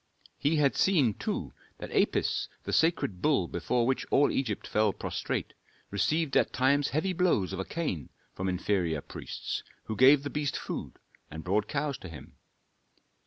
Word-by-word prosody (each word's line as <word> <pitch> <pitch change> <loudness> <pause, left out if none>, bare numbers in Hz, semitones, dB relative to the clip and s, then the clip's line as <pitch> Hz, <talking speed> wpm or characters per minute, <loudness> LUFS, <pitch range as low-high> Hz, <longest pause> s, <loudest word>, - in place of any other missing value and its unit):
He 150 +3 +2
had 145 -3 +3
seen, 150 - +3
too, - - -4 0.2
that - - -8
Apis, - - +1
the - - -4
sacred 160 - +2
bull 140 - +2
before 115 +9 0
which 130 +1 +1
all 145 - +4
Egypt 115 -7 -2
fell 105 -1 +2
prostrate, - - -3 0.4
received 150 +8 +1
at - - +3
times 140 +2 +3
heavy 185 +6 0
blows 170 - +1
of - - -4
a 95 - -2
cane 150 - -3 0.2
from 95 0 -2
inferior 90 -4 0
priests, - - -5 0.2
who 110 - -4
gave 135 +5 +6
the 145 - -4
beast 145 -2 -1
food - - -5 0.3
and 80 +1 -7
brought 105 +3 +1
cows 145 -1 -2
to 90 - -9
him. 80 - -11
130 Hz, 165 wpm, -29 LUFS, 95-150 Hz, 0.4 s, gave